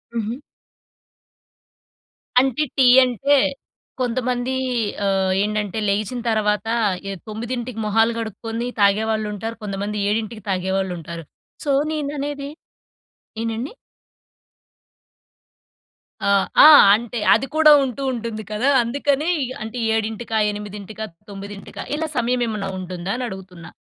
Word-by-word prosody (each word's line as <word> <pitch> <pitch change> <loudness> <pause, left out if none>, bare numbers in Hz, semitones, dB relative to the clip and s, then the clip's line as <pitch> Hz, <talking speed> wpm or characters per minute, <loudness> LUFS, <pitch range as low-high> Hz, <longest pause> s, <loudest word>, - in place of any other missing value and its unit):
హుహు. 230 +3 -3 2.0
అంటే, 270 +3 +1
టీ 265 - +5 0.2
అంటే, 270 +4 +2 0.7
కొంతమందీ 250 0 -1 0.5
ఆహ్, 190 -1 +1
ఏంటంటే, 210 0 -2
లెగిచిన 210 +5 -1
తరవాత, 215 0 +1 0.4
ఏ - - -3 0.2
9కి 235 +2 -5
మొహాలు 225 +2 +3
కడుక్కొని 225 +2 -4
తాగేవాళ్లుంటారు. 215 +1 +1
కొంతమంది 205 +1 -3
7కి 220 0 -2
తాగేవాళ్లుంటారు. 180 -3 -2 0.4
సో, 285 - +1 0.2
నేననేది 285 -1 -3 0.9
ఏంటండి? 230 - -3 2.5
ఆహ్, 200 -1 +3 0.2
ఆ! - - +10 0.3
అంటే, 235 +1 -4
అది 270 - +1
కూడా 310 -1 +7
ఉంటూ 265 +1 -4
ఉంటుంది 230 -2 -5
కదా! 230 +6 +1
అందుకని 280 +5 0 0.3
అంటే 225 +3 -6 0.2
7కా, 225 +1 -2
8కా, 210 +1 -7 0.2
9కా? 200 0 -8
ఇలా 320 +1 -2
సమయమేమన్నా 230 -5 0
ఉంటుందా 185 +1 -5
అనడుగుతున్నా? 190 -8 -7
220 Hz, 95 wpm, -21 LUFS, 200-245 Hz, 2.5 s, ఆ